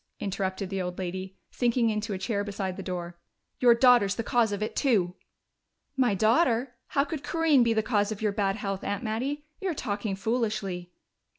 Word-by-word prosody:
interrupted 190 0 -3
the 195 -1 -1
old 180 0 -4
lady, 185 +1 -5
sinking 240 -2 +2
into 215 +1 -2
a 195 - -1
chair 200 +1 -1
beside 195 -2 -3
the 195 - -6
door. 175 -2 -5 0.4
"Your 240 -2 +6
daughter's 235 -5 +5
the 230 - -2
cause 235 -3 +2
of 205 +1 -2
it, 215 - -4
too!" 200 -10 +2 0.8
"My 250 -6 +2
daughter? 235 - +2
How 275 - +2
could 310 -1 -5
Corinne 325 -5 +3
be 235 -1 +3
the 220 -1 +1
cause 210 -2 +1
of 210 - -4
your 215 -1 +1
bad 200 -1 0
health, 195 -3 -4
Aunt 205 +4 -2
Mattie? 260 +7 -2
You're 370 -4 -2
talking 205 -4 -2
foolishly." 200 -4 -2
215 Hz, 185 wpm, -28 LUFS, 195-240 Hz, 0.8 s, Your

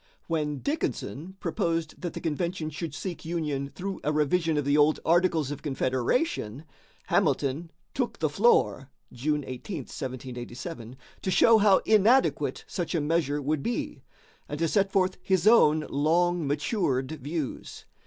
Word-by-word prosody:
When 150 -3 -2
Dickinson 190 - -3
proposed 165 -2 -2
that 175 -2 -4
the - - -5
convention 165 0 -2
should 155 -1 -5
seek 180 +3 -5
union 150 -5 -2
through 195 +5 -6
a 150 - +1
revision 155 +2 +1
of 145 - 0
the 140 +1 +2
old 150 +1 +4
Articles 165 -4 +2
of 145 - -6
Confederation, 135 - -1 0.4
Hamilton 145 +5 +1 0.2
took 250 -3 -2
the 155 - +1
floor 150 - +2 0.2
(June 145 +4 -1
18, 135 +6 -5
1787) 125 0 -7 0.2
to - - -2
show 225 +4 +6
how 200 -2 +5
inadequate 220 +5 +3
such 175 -1 -3
a - - +2
measure 150 -2 0
would 150 +1 0
be, 235 +10 -3 0.5
and 145 - -4
to 165 +2 +1
set 195 +3 +1
forth 185 -1 +1
his 190 -2 +1
own 155 -9 +5
long 170 +3 +1
matured 145 - 0
views. 150 0 -5
155 Hz, 145 wpm, -27 LUFS, 140-180 Hz, 0.5 s, show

